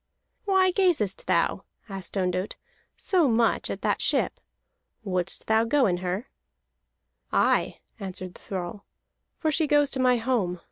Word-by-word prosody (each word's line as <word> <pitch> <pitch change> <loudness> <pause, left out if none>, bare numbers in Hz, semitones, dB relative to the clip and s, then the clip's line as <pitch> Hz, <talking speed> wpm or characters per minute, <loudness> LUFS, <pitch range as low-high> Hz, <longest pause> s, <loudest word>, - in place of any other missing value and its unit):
"Why 380 -2 +4
gazest 350 - +1
thou," - - +1 0.2
asked 195 -1 -5
Ondott, 185 +1 -1 0.4
"so 355 -6 +3
much 230 -1 +2
at - - -5
the - - +2
ship? - - 0 0.6
Wouldst 185 -2 -2
thou 220 0 +3
go 265 +3 +3
in 180 -3 +1
her?" 185 +6 -3 1.0
"Aye," - - +2 0.2
answered 185 -2 -6
the - - -16
thrall, 190 +1 -6 0.5
"for 315 - 0
she 310 +1 +1
goes 290 -1 +3
to 265 - -3
my 250 -1 +4
home. 225 -7 -1
220 Hz, 140 wpm, -26 LUFS, 185-290 Hz, 1.0 s, Why